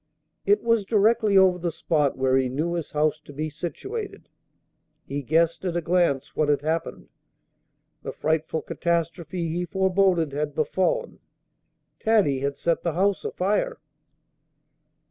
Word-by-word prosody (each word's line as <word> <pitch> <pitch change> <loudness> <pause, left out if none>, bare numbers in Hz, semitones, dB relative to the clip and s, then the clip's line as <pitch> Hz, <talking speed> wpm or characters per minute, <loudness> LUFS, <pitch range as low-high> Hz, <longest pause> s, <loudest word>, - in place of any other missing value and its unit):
It 205 +1 +3
was 230 -2 +2
directly 215 0 +3
over 185 -2 +5
the 170 0 -2
spot 150 -4 0
where 130 0 +2
he 130 -1 +2
knew 155 +7 -2
his 170 -3 -3
house 155 +1 +1
to 155 - -14
be 155 +2 -4
situated. 395 - -6 0.8
He 145 +1 -4
guessed 160 +6 +1
at 175 -2 -1
a - - 0
glance 165 -5 +1
what 150 -1 +1
had 145 -1 +2
happened. 160 +2 -3 0.9
The - - -5
frightful 160 0 -1
catastrophe 170 0 -2
he 175 +2 -2
foreboded 190 -3 +2
had 145 0 -3
befallen. 180 +4 -1 0.8
Taddy 205 -12 +2
had 140 +1 -2
set 170 -1 0
the 170 - -1
house 195 +3 +1
afire. 200 +3 -1
170 Hz, 140 wpm, -25 LUFS, 150-190 Hz, 0.9 s, over